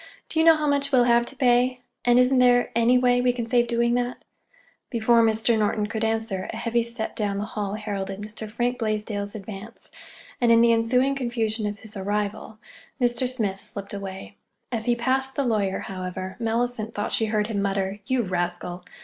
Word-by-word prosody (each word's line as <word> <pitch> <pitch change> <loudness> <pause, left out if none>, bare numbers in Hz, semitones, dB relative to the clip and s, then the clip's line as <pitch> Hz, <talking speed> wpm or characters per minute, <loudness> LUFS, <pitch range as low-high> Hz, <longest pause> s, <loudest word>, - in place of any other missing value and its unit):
"Do 320 - 0
you 320 - +4
know 325 - +9
how 305 -1 -2
much 280 -1 +1
we'll 255 -3 +5
have 235 0 +4
to - - -8
pay? 250 0 +3 0.2
And 245 0 +4
isn't 250 +1 +4
there 245 -1 +4
any 235 +2 +4
way 245 0 +3
we 250 0 +3
can 240 -2 -4
save 240 0 +2
doing 235 0 +1
that?" 245 0 -2 0.6
Before 235 0 +3
Mr. 225 +1 +2
Norton 210 0 +1
could 220 +1 -3
answer, 220 -4 -1
a - - -7
heavy 235 +1 0
step 235 -1 -4
down 205 -3 -1
the 205 - -2
hall 210 -2 -4
heralded 200 -2 -4
Mr. 215 +1 -7
Frank 240 +3 -1
Blaisdell's 210 -2 -2
advance, 210 +2 -9 0.5
and 240 -1 +4
in 230 0 +6
the 235 0 +5
ensuing 250 +4 +2
confusion 230 -4 -1
of 205 0 -4
his 220 -1 -12
arrival, 205 +2 -3 0.4
Mr. 245 0 +1
Smith 210 -7 -2
slipped 200 0 -7
away. 195 0 -7 0.3
As 225 -2 -2
he 240 - +2
passed 265 +2 +1
the 280 - 0
lawyer, 205 -5 0
however, 185 0 -5
Mellicent 230 -1 -1
thought 205 - -2
she 220 - +1
heard 210 -1 +1
him 210 -2 -2
mutter, 195 0 -1
"You 260 -2 +1
rascal!" 175 -1 -3
225 Hz, 190 wpm, -25 LUFS, 205-245 Hz, 0.6 s, know